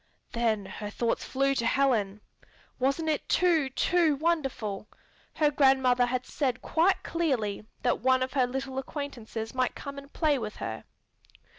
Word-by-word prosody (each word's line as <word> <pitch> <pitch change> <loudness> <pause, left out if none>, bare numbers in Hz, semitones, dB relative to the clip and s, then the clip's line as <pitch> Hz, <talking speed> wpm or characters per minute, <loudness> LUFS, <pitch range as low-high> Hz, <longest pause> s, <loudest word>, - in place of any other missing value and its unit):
Then 225 -4 0
her 205 +2 -6
thoughts 230 +2 -1
flew 275 +1 +1
to 235 -4 -1
Helen. 220 -7 +1 0.6
Wasn't 275 +5 +1
it 305 -2 -1
too, 330 -6 +3
too 325 +3 +2
wonderful? 270 -11 -1 0.5
Her 300 -1 +3
grandmother 265 -3 +4
had 255 0 -2
said 260 -5 -2
quite 355 +4 +2
clearly 240 -12 -1 0.2
that 245 - +2
one 260 +2 +3
of 255 - -4
her 260 -3 +3
little 265 +1 -3
acquaintances 245 -6 -6
might 255 -1 0
come 280 -1 -7
and 280 +1 -14
play 300 -4 +1
with 215 -2 -5
her. 110 - -5
265 Hz, 150 wpm, -28 LUFS, 235-285 Hz, 0.6 s, grandmother